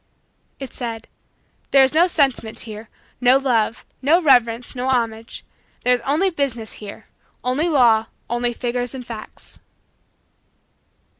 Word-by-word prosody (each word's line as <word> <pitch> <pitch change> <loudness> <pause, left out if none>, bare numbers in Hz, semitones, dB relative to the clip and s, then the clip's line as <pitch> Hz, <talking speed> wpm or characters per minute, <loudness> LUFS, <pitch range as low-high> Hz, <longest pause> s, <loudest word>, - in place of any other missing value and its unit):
It 270 -2 -7
said: 230 -2 -6 0.6
"There 275 -1 +6
is 265 - +2
no 335 +3 +5
sentiment 270 -9 0
here, 215 -1 -8 0.3
no 250 +2 +6
love, 235 -4 0 0.2
no 305 +6 +4
reverence, 245 -6 +3
no 255 +1 -2
homage; 230 -3 -2 0.4
there 250 - +4
is 245 - 0
only 315 +10 +1
business 260 -8 -3
here, 205 -1 -9 0.4
only 275 +7 0
law, 235 -7 +4 0.2
only 240 +1 -1
figures 245 +1 -3
and 255 -2 -7
facts." 225 -3 -10
245 Hz, 130 wpm, -21 LUFS, 230-275 Hz, 0.6 s, There